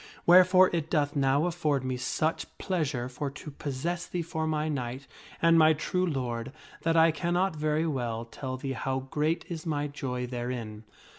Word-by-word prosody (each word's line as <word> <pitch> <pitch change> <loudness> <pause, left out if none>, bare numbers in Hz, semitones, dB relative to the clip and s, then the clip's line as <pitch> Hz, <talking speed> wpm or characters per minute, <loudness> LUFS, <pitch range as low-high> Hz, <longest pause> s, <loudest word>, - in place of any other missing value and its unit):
Wherefore 185 +1 +7
it 165 -2 -1
doth 145 -3 +1
now 140 +2 +2
afford 155 -6 0
me 130 0 -2
such 145 +6 -1
pleasure 150 -9 -1
for 140 +3 -4
to 145 +2 -9
possess 150 +6 -3
thee 175 -1 -3
for 160 -1 -3
my 155 0 0
knight 130 -2 -3 0.4
and 165 0 +6
my 160 0 +6
true 180 +4 -1
lord, 125 -5 -3 0.3
that 165 0 +1
I 165 0 +6
cannot 175 +3 0
very 155 +1 0
well 120 -6 -2
tell 130 +2 -6
thee 135 +1 -4
how 130 +2 -2
great 150 +5 -1
is 165 -3 -5
my 145 -2 0
joy 130 -3 -4
therein." 120 -3 -5
150 Hz, 170 wpm, -29 LUFS, 130-165 Hz, 0.4 s, Wherefore